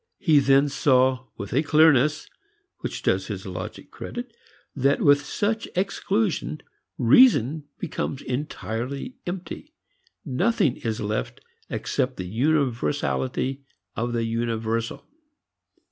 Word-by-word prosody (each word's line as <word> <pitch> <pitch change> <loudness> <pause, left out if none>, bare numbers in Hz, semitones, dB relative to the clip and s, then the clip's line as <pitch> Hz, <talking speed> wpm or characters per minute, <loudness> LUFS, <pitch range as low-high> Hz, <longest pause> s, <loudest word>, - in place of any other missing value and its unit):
He 155 -4 +4
then 140 +1 +4
saw 130 -2 +2
with 100 +2 -6
a 135 - +3
clearness 150 -1 +4 0.5
which - - -5
does - - +1
his - - -5
logic - - -7
credit 240 -1 -7 0.4
that 140 +1 +2
with 145 0 +5
such 220 +8 -1
exclusion, 195 -4 -1 0.4
reason 145 - +5
becomes 140 - -4
entirely 130 - -4
empty: 185 - -6 0.5
nothing 155 - +1
is 110 -2 -3
left 105 +1 -3 0.3
except 130 -2 -2
the 90 - -4
universality 130 - 0 0.3
of 120 +2 -2
the 115 -1 0
universal. 115 0 -2
140 Hz, 105 wpm, -25 LUFS, 120-155 Hz, 0.5 s, with